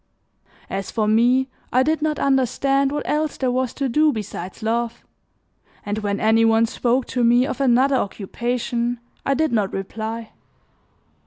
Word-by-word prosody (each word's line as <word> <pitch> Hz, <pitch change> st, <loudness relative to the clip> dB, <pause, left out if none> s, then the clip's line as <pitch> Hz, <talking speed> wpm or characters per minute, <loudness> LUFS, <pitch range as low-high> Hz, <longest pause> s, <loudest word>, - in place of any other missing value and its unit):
As 195 Hz, -1 st, -4 dB
for 215 Hz, -2 st, -1 dB
me 245 Hz, +4 st, +3 dB, 0.2 s
I 255 Hz, +1 st, +4 dB
did 310 Hz, +2 st, 0 dB
not 305 Hz, -1 st, 0 dB
understand 275 Hz, +1 st, +1 dB
what 295 Hz, -, -3 dB
else 305 Hz, 0 st, -1 dB
there 255 Hz, -2 st, 0 dB
was 255 Hz, -1 st, 0 dB
to 275 Hz, -, -1 dB
do 305 Hz, +5 st, +3 dB
besides 210 Hz, -3 st, -6 dB
love, 230 Hz, +1 st, -2 dB, 0.8 s
and 205 Hz, +1 st, -2 dB
when 205 Hz, -1 st, -2 dB
any 220 Hz, +1 st, +3 dB
one 225 Hz, 0 st, +4 dB
spoke 245 Hz, +3 st, 0 dB
to 245 Hz, -, 0 dB
me 240 Hz, +2 st, +4 dB
of 280 Hz, -, -4 dB
another 265 Hz, +1 st, +3 dB
occupation 240 Hz, +3 st, -2 dB, 0.3 s
I 275 Hz, -, +2 dB
did 315 Hz, +2 st, +1 dB
not 210 Hz, -4 st, +1 dB
reply. 220 Hz, +3 st, -5 dB
240 Hz, 155 wpm, -22 LUFS, 225-270 Hz, 0.8 s, I